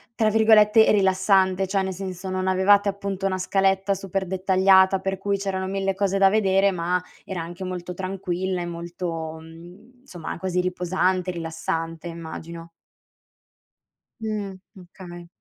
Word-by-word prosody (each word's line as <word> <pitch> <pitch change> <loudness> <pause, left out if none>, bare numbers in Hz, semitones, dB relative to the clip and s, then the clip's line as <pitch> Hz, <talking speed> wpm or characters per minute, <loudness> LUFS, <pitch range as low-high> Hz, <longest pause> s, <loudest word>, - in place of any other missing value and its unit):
tra 220 -1 +2
virgolette 220 0 +5
"rilassante", 190 -1 +3
cioè 195 0 0
nel 190 0 -3
senso 185 0 -6
non 185 0 -2
avevate 200 +2 +4
appunto 195 -1 -4
una 185 -1 -1
scaletta 195 +1 +1
super 195 0 -3
dettagliata 190 +1 +4
per 195 0 -3
cui 200 0 -1
c'erano 190 -1 -3
mille 195 0 -1
cose 195 0 0
da 195 0 +5
vedere, 195 -1 +3
ma 180 0 -1 0.2
era 185 -3 -5
anche 175 +3 -7
molto 180 -1 -5
tranquilla 185 -1 -3
e - - -3
molto, 170 -2 -5
mhmm, 175 +10 -15
insomma, 175 -9 -7
quasi 180 -1 -1
riposante, 185 0 0
rilassante 165 0 -4
immagino. 165 0 -8 1.5
Mh, 210 -3 -4 0.2
okay. 175 -1 -11
190 Hz, 135 wpm, -24 LUFS, 175-195 Hz, 1.5 s, virgolette